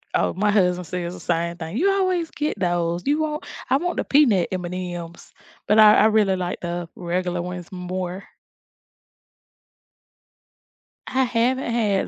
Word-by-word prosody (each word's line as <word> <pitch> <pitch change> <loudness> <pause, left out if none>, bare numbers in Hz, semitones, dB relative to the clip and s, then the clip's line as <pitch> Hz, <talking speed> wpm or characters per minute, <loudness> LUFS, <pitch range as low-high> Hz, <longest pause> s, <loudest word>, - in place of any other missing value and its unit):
Oh, - - +1
my 210 +2 +2
husband 180 -3 +2
says 175 +1 -4
the - - -10
same 170 0 -1
thing, 160 +3 -6
"You 390 +8 +3
always 370 -4 0
get 300 -7 -3
those. 175 -1 0
You 295 +2 +2
want 305 0 -3 0.3
I 270 - +5
want 350 +4 -2
the - - 0
peanut 240 - +3
M&M's," 175 -2 -6 0.3
but 210 +1 +4
I 215 -1 +8
I - - +5
really 215 -3 +3
like 180 -1 -3
the 175 0 -4
regular 175 0 -2
ones 180 0 -7
more. 180 +1 -5 2.8
I 265 0 +1
haven't 245 +1 0
had 210 -5 +1
185 Hz, 150 wpm, -23 LUFS, 175-240 Hz, 2.8 s, I